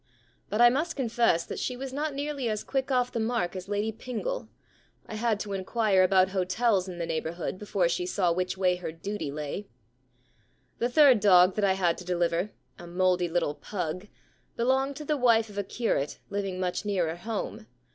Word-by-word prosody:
But 210 - +1
I 240 0 +8
must 310 +6 -1
confess 235 - +2
that - - -5
she 250 - -2
was 265 0 -6
not 295 +1 -2
nearly 280 -3 -2
as 215 -1 -2
quick 270 0 -2
off 250 -2 +1
the 230 - -2
mark 220 -5 -1
as 185 +1 -7
Lady 205 +2 0
Pingle. 255 - -4 0.6
I - - -9
had 220 -1 0
to 205 -1 -4
inquire 195 0 +2
about 185 0 +4
hotels 190 +1 +1
in 180 -2 -7
the 170 - -2
neighbourhood 165 +2 -3
before 200 -4 +1
she 180 +1 -1
saw 180 -2 +1
which 185 +2 -1
way 180 -1 +2
her 180 - -5
duty 165 -1 -5
lay. 150 +7 -5 0.5
* 125 - -39
The 240 - +1
third 265 -3 +6
dog 185 -2 +6
that 210 - -1
I 190 - +4
had 180 -3 +1
to - - -8
deliver, 175 +1 0 0.3
a 175 - -9
mouldy 180 0 +1
little 165 -3 0
pug, 180 +2 -5 0.5
belonged 265 +3 +1
to 300 - -7
the 300 0 0
wife 230 -3 +3
of 205 0 -5
a - - 0
curate 190 - -1
living 195 -2 -2
much 180 +1 -1
nearer 180 -6 0
home. 200 - -5
200 Hz, 195 wpm, -28 LUFS, 180-235 Hz, 0.6 s, I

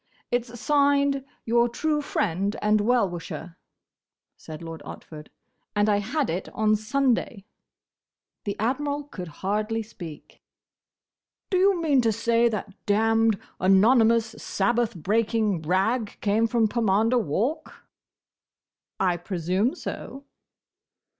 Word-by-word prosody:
"It's 240 -1 -2
signed, 280 -1 +2 0.2
'Your 235 +1 +3
true 300 +5 -1
Friend 200 - -1
and 210 0 +2
Well 235 -1 +3
wisher,'" 170 -1 -7 0.8
said 155 +1 -10
Lord 165 -1 -7
Otford, 150 -1 -10 0.5
"and 205 0 +3
I 205 -1 +3
had 260 +8 -1
it 175 +3 -3
on 215 0 +3
Sunday." 235 -2 0 1.0
The 200 - -2
Admiral 285 +6 -1
could 190 -11 -8 0.2
hardly 215 +3 0
speak. 170 -8 -11 1.1
"Do 370 - +3
you 385 -1 +4
mean 295 -6 +3
to 225 -2 +2
say 230 +2 +2
that 210 -3 -4
damned, 225 0 +3 0.2
anonymous, 225 +4 +4
Sabbath 230 +2 0
breaking 210 +1 0
rag 200 +7 0
came 220 +2 +2
from 225 -1 +2
Pomander 225 +2 +2
Walk?" 240 - -2 1.2
"I 180 -2 +2
presume 185 - -1
so." 275 -5 -7
225 Hz, 115 wpm, -25 LUFS, 195-245 Hz, 1.2 s, you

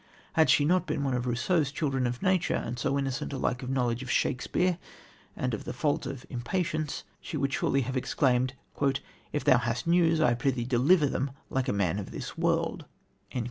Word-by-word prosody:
Had 160 -5 +4
she 145 - +5
not 180 +3 +2
been 150 -2 -1
one 135 -2 0
of 125 0 -1
Rousseau's 135 +5 +1
children 135 -4 0
of 120 0 -4
nature, 185 -2 +2
and 120 +1 -3
so 140 +3 +1
innocent 135 0 -2
alike 125 -2 -1
of 125 - -5
a - - -1
knowledge 125 -2 0
of 130 - -7
Shakespeare 180 +8 +1 0.6
and 125 -1 -2
of 110 - -3
the - - -5
fault 145 +3 0
of 135 -2 -6
impatience, 155 +4 -2 0.2
she 160 - -5
would 140 -1 0
surely 135 - +2
have 130 +1 -3
exclaimed: 130 0 +1 0.8
"If 150 - -1
thou 130 - +5
hast 120 0 -2
news, 165 -1 +4
I 140 -6 +4
prithee 120 0 0
deliver 140 +7 +4
them 140 0 -1 0.2
like 130 -1 0
a - - +2
man 100 -1 0
of 100 - -6
this - - -6
world." - - 0
135 Hz, 195 wpm, -29 LUFS, 125-155 Hz, 0.8 s, she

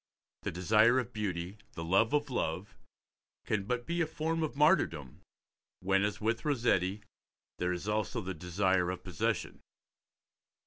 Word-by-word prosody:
The - - -2
desire 110 +7 +4
of 125 -1 -2
beauty, 95 -3 -3 0.2
the 80 - -5
love 95 +7 +3
of 145 -2 0
love, 100 0 -2 0.7
can 100 -2 0
but 120 +2 -2
be 170 +1 -1
a 165 - +1
form 160 +1 -2
of 155 -2 -2
martyrdom 110 - +2 0.6
when, 95 +1 +2
as 105 0 -1
with 110 +2 0
Rossetti, 110 - +1 0.6
there 90 0 0
is 90 +3 -4
also 105 -2 -1
the 95 0 -4
desire 90 +1 +1
of 90 0 -4
possession. 90 -5 -2
105 Hz, 145 wpm, -32 LUFS, 90-125 Hz, 0.7 s, desire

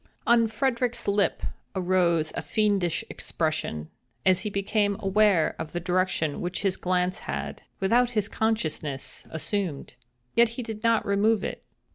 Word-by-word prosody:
On 235 -1 +5
Frederick's 240 +1 -1
lip 200 0 +1 0.3
arose 175 -4 +2
a - - -2
fiendish 200 -6 +1
expression, 155 - -3 0.3
as 185 -1 +5
he 210 - -2
became 200 0 0
aware 195 -4 +3
of 155 - -5
the 175 - -1
direction 180 -4 0
which 180 +2 -3
his 195 -2 +2
glance 180 0 0
had, 70 +1 -5 0.2
without 235 +6 +3
his 205 -1 +2
consciousness, 160 -12 -2
assumed. 160 -1 -3 0.4
Yet 235 0 +6
he 250 - -2
did 220 -1 -7
not 230 -1 +3
remove 205 +2 +2
it. - - -4
195 Hz, 140 wpm, -27 LUFS, 170-215 Hz, 0.4 s, Yet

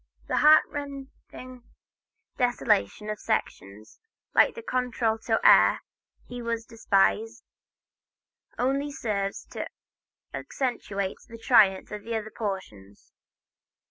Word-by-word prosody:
The - - -1
heart 305 +1 +7
rending 270 -3 -9 0.7
desolation 215 - 0
of 210 - -6
selections 105 - -4 0.3
like - - +4
the 465 - -8
contralto 235 - -1
air, - - +6 0.4
"He 245 0 -8
was 230 -1 -3
Despised," 225 +1 0 1.1
only 275 +3 0
serves 200 -7 -3
to - - -5 0.7
accentuate 200 -7 -3
the 230 - -10
triumph 210 -5 +3
of 210 +1 -8
other 220 -2 -3
portions. 110 - -7
225 Hz, 95 wpm, -26 LUFS, 200-250 Hz, 1.1 s, heart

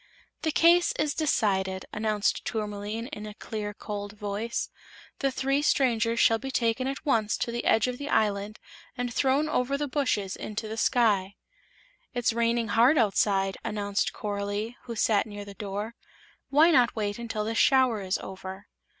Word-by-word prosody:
"The 320 - 0
case 340 +3 +5
is 300 -1 0
decided," 190 - 0
announced 210 -1 0
Tourmaline, 210 0 -3
in 210 0 -6
a 210 - -9
clear, 210 -1 -5
cold 205 0 -6
voice. 210 +2 -3 0.5
"The 275 - +1
three 275 +2 0
strangers 235 -6 +2
shall 225 0 +4
be 270 - -5
taken 250 0 0
at 275 +1 -5
once 225 -6 +2
to 235 - -2
the 240 0 -3
edge 220 - +4
of 250 -1 -3
the 285 +1 -5
island 210 -1 0 0.4
and 245 -1 -2
thrown 275 +4 +2
over 275 -2 0
the 295 0 -2
bushes 255 -9 -1
into 215 +1 -5
the 220 - -5
sky." 210 -5 +2 0.8
"It's 245 -1 +1
raining 235 -1 +1
hard 245 +9 +5
outside," 195 -3 +2
announced 205 -2 -1
Coralie, 205 +2 -3
who 235 -2 -5
sat 215 -1 +2
near 205 -1 -7
the 200 - -9
door; 205 +3 -5 0.6
"why 310 +5 +6
not 250 -6 +4
wait 205 -1 -2
until 225 -2 -3
this 225 +1 -1
shower 260 -6 +4
is 185 -1 -1
over?" 190 +1 -8
220 Hz, 165 wpm, -27 LUFS, 205-250 Hz, 0.8 s, why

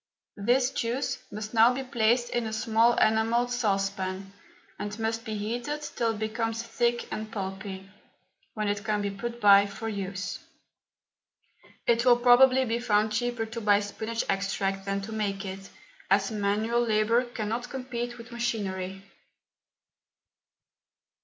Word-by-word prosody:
This 250 +4 +3
juice 240 +3 -2
must 215 +1 -6
now 230 +1 +6
be 270 - -3
placed 240 -1 +1
in 240 -2 -1
a 220 - -5
small 225 +2 +3
enamelled 225 +3 +2
saucepan, 195 -4 -1 0.5
and 205 +1 -4
must 225 0 -2
be 215 -1 -4
heated 240 +8 -3
till 235 -5 -1
it - - -7
becomes 225 +1 -2
thick 235 +1 0
and 215 0 -5
pulpy, 195 -1 -5 0.7
when 215 -1 -1
it 205 0 -1
can 210 -1 0
be 200 - -1
put 235 +4 -5
by 200 -2 +7
for 220 +3 -6
use. 200 -2 -4 1.5
It 235 0 +3
will 245 -1 +6
probably 255 +2 +6
be 230 0 -1
found 215 -2 +2
cheaper 240 +1 -1
to 230 +1 -6
buy 205 -1 +4
spinach 220 +3 -3
extract 195 0 -1
than 195 0 -1
to 205 +3 -7
make 205 -2 -2
it, 195 0 -7 0.4
as 195 +1 +3
manual 215 +3 +1
labour 230 +1 +2
cannot 240 +1 -4
compete 245 -2 -4
with 230 0 -11
machinery. 195 -5 -3
220 Hz, 140 wpm, -28 LUFS, 200-235 Hz, 1.5 s, by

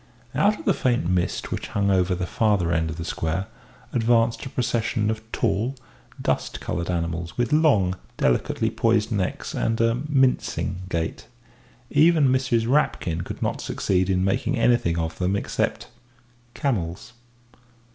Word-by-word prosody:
Out 210 +1 +3
of - - -11
the - - +4
faint 120 -9 0
mist 90 -1 -1
which - - -3
hung 100 -1 +2
over 90 -1 +2
the 90 0 -2
farther 100 -4 +1
end 80 -1 +1
of 80 - -4
the 85 0 -6
square 80 +4 -2 0.5
advanced 115 -1 +2
a 135 - -5
procession 115 -3 0
of 110 0 -4
tall, 120 +7 0 0.4
dust - - -1
coloured 85 0 -3
animals, 85 0 -3
with 120 +2 0
long, 120 - +3 0.2
delicately 60 - +1
poised 115 -1 +1
necks 100 -4 -2
and 115 0 0
a 115 +2 +2
mincing 130 - +1
gait. 80 -2 -3 0.6
Even 155 -1 +5
Mrs. 125 -3 +1
Rapkin 105 - +1
could - - -6
not - - -1
succeed 95 -1 0
in 95 0 +2
making 95 +7 0
anything 115 -8 +2
of 80 -1 -3
them 95 +2 +1
except 100 - -2 0.7
camels. 105 - -2
105 Hz, 145 wpm, -24 LUFS, 90-120 Hz, 0.7 s, Even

